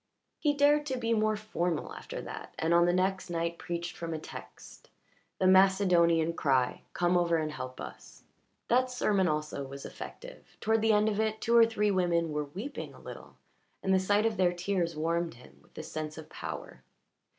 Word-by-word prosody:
He 295 -2 +2
dared 295 +1 +4
to 260 -2 -1
be 230 -1 0
more 215 -1 +2
formal 180 -6 -2
after - - -7
that, - - -8
and 165 +1 +1
on 170 0 +5
the - - +4
next 185 +1 0
night 170 0 -2
preached 170 0 -4
from 165 -1 -4
a - - -2
text 155 - -11 0.5
the 190 - 0
Macedonian 180 -4 +5
cry, 130 -6 +1
"Come 175 0 +2
over 170 -1 +3
and 155 -1 -2
help 130 -3 -7
us." - - -10 0.4
That 255 +2 +3
sermon 210 -6 +1
also 150 -2 -2
was 135 0 -8
effective: - - -10
toward 220 0 +2
the 225 0 +4
end 210 0 +4
of 210 -1 0
it 220 0 0
two 235 +2 +1
or 230 -1 +8
three 210 -2 +1
women 170 -3 +1
were 150 0 -1
weeping 200 - -7
a - - -14
little, - - -11 0.5
and 190 - +2
the 190 - +5
sight 205 +3 +2
of 225 -2 0
their 180 -1 +3
tears 175 -2 -1
warmed 165 +2 -1
him 125 - -17
with - - -27
the - - -6
sense 155 0 -5
of 160 -1 -9
power. - - -7
180 Hz, 195 wpm, -30 LUFS, 165-215 Hz, 0.5 s, or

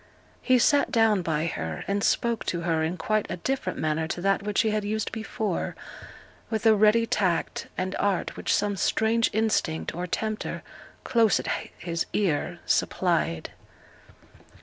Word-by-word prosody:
He 255 -1 +4
sate 285 +4 +3
down 225 -4 +3
by 160 -2 -1
her, 80 - -4
and 200 0 0
spoke 235 -1 +1
to 170 - -2
her 165 -2 0
in 165 +3 -1
quite 215 +5 0
a - - -3
different 220 -2 -2
manner 155 +1 0
to 175 - -4
that 195 +1 +2
which 205 +2 +1
he 220 -3 +1
had 210 0 0
used 215 +1 -2
before, 220 -3 -3 0.7
with 220 0 -2
a 220 - +7
ready 215 +2 +4
tact 185 -7 0
and 185 +1 -2
art 200 -3 0
which - - -2
some 205 -1 +1
strange 225 +4 +2
instinct 210 -7 0
or 180 +2 -4
tempter 215 +4 -3 0.4
'close 225 -4 +3
at - - -5 0.3
his 170 -1 -3
ear' 175 -2 0
supplied. 170 - 0
200 Hz, 155 wpm, -26 LUFS, 170-220 Hz, 0.7 s, a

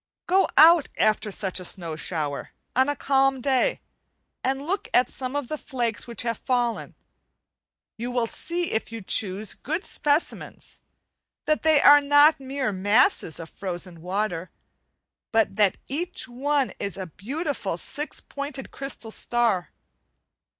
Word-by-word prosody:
Go 380 +2 +3
out 330 -1 +7
after 215 0 +2
such 190 -2 -1
a - - -7
snow 170 -3 -1
shower, 155 -3 -3 0.2
on 260 +3 +3
a 290 - 0
calm 270 -1 +2
day, 270 - +1 0.6
and 270 +2 -1
look 380 +5 -2
at 250 - +4
some 260 +1 -5
of 290 -3 -2
the 305 +2 -4
flakes 240 -5 -2
which 235 0 -3
have 230 -2 -2
fallen; 245 -2 -1 1.0
you 235 +2 -4
will 245 -1 0
see, 340 +8 -3
if 220 - -2
you 225 -2 -7
choose 200 +2 -1
good 320 +6 -4
specimens, 295 +2 -2 0.7
that 305 0 +1
they 315 -2 +5
are 290 0 +8
not 290 +2 +5
mere 270 -3 -2
masses 205 - +2
of 165 -1 -9
frozen 175 -3 -5
water, 185 -1 -2 0.8
but 225 -1 +2
that 205 -3 +3
each 340 +2 -3
one 275 +2 0
is 200 -1 -2
a 190 - -4
beautiful 220 - -4
six 290 - -4
pointed 280 -1 -6
crystal 270 -5 -4
star. 230 -7 0
245 Hz, 145 wpm, -25 LUFS, 200-290 Hz, 1.0 s, are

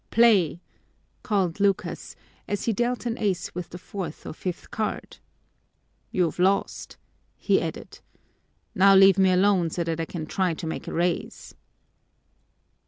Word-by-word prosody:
"Play!" 205 -9 +4 0.6
called 195 -6 -1
Lucas, 200 -1 -1 0.3
as 205 - -3
he 230 - +1
dealt 240 +3 -1
an 235 -1 -2
ace 200 -5 -1
with 180 0 -6
the 175 - -8
fourth 180 -3 -7
or - - -6
fifth 180 +2 -6
card. 215 0 -4 0.9
"You've 175 -2 -1
lost," 195 +2 0 0.4
he - - +2
added. - - -6 0.7
"Now 195 +1 +6
leave 195 0 +7
me 190 -1 +5
alone 185 -2 +3
so 170 +2 -2
that 165 -1 -3
I 165 - -1
can 160 -1 -6
try 180 +1 -1
to 165 - -7
make 160 - -5
a - - -4
raise." 175 0 -2
185 Hz, 145 wpm, -25 LUFS, 170-200 Hz, 0.9 s, leave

